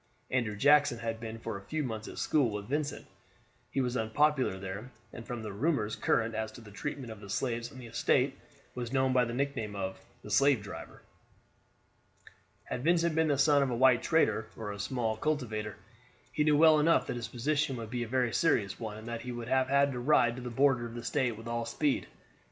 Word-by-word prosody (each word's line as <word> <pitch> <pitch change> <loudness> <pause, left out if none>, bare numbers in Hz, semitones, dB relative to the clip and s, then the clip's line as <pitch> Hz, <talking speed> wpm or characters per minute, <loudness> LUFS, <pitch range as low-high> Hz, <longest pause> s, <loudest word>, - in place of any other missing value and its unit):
Andrew 120 -5 0
Jackson 145 +2 +4
had 115 -1 -4
been 115 0 -6
for 115 -2 -5
a 100 - -17
few 155 +5 -2
months 110 -4 -4
at - - -9
school 140 -6 +2
with 105 -1 -5
Vincent; 145 +3 -2 0.6
he 135 - 0
was 125 -1 -1
unpopular 130 0 +2
there, 100 +5 -6 0.2
and 115 - -9
from 120 -2 -5
the 105 -2 -5
rumors 110 -2 0
current 115 0 +1
as 110 0 -3
to - - -11
the 110 -3 -13
treatment 130 +2 -5
of 110 - -9
the 100 -1 -11
slaves 120 +1 -2
on 130 - -12
the 125 - -9
estate, 115 - +1 0.4
was 120 -2 -5
known 130 -1 +2
by 125 -1 +4
the 115 - -4
nickname 125 -6 -2
of 95 -1 -4 0.2
the - - -8
"slave 140 -5 +4
driver." 100 - -9 1.6
Had 125 - -5
Vincent 170 0 +3
been 160 0 +2
the 145 -2 +2
son 145 +1 +5
of 135 - +1
a 120 - -1
white 125 0 +5
trader, 110 -9 +2
or 110 -2 -4
a 100 - -7
small 110 +1 -1
cultivator, 110 -8 -2 0.6
he 150 - +1
knew 150 -1 +4
well 155 0 +7
enough 165 +3 +4
that - - -3
his 120 -1 -4
position 140 +2 -1
would 115 -1 -7
be 125 -1 -2
a 120 - -2
very 125 -1 0
serious 105 - +1
one, 110 -2 -5
and 110 +1 -10
that 115 -1 -4
he 125 - -5
would 120 0 -6
have 130 0 +2
had 140 +1 +4
to 125 - -4
ride 120 -3 +3
to 130 - -7
the 125 - -5
border 130 -1 +2
of 115 - -10
the 120 - -6
State 120 -2 0
with 115 - -10
all 115 0 -2
speed. 135 +5 0
120 Hz, 220 wpm, -31 LUFS, 110-140 Hz, 1.6 s, well